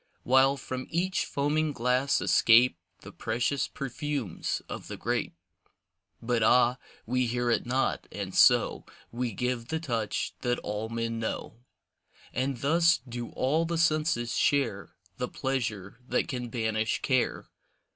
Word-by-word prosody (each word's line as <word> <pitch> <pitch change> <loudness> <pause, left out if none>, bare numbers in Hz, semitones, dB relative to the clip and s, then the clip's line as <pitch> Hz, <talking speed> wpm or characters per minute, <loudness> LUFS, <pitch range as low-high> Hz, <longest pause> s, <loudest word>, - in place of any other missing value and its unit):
While 130 +2 +4
from 130 -1 -5
each 180 +3 0
foaming 150 +2 0
glass 125 +3 +1
escape 120 -1 +5 0.3
The - - -10
precious 120 +4 -1
perfumes 140 - -3
of - - -7
the - - -6
grape. - - -2 0.9
But 120 0 +1
ah, 125 +3 +4 0.3
we 125 +1 +1
hear 120 0 0
it 115 - 0
not, 130 +2 0
and - - -5
so - - +4 0.3
We 120 0 -2
give 125 +2 -2
the 160 +3 -2
touch 115 -9 -2
that 120 -1 0
all 105 +2 -3
men 115 0 -2
know. 115 0 -4 0.7
And 130 -1 -2
thus 165 +4 +4
do 120 0 -5
all 150 +6 +1
the 170 0 -2
senses 155 -7 +1
share 135 -9 0 0.2
The 125 - -2
pleasure 115 -6 -3
that - - 0
can 125 -3 -4
banish 110 -2 -1
care. 130 -3 0
125 Hz, 135 wpm, -28 LUFS, 115-140 Hz, 0.9 s, escape